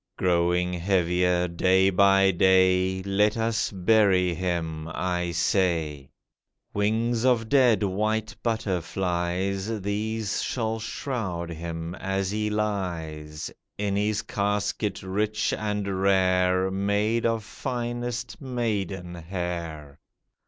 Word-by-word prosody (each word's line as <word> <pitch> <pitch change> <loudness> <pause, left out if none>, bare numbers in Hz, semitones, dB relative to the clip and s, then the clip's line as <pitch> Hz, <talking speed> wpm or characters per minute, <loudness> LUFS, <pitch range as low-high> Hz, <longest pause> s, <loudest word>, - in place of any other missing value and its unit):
Growing 90 0 +2
heavier, 90 0 +1
day 95 +3 +3
by 95 0 +5
day, 95 0 +3
Let 105 +3 +2
us 115 0 0
bury 95 -2 +3
him, 85 -3 -3
I 90 0 -1
say. 85 -5 0 0.6
Wings 110 +3 +1
of 120 -3 +3
dead 125 -7 +4
white 110 +3 -1
butterflies, 95 -1 -1
These 105 +1 -2
shall 110 -2 -2
shroud 105 -7 -4
him, 85 0 -5
as 95 +1 -2
he 105 0 -1
lies 85 -8 -3 0.3
In 100 -1 -1
his 105 +1 0
casket 100 -1 -1
rich 105 +3 -1
and 105 -3 -2
rare, 95 -1 +3
Made 105 +4 +1
of 115 -1 -1
finest 120 0 -4
maiden 100 -9 -2
hair. 85 -4 -5
95 Hz, 100 wpm, -26 LUFS, 90-105 Hz, 0.6 s, by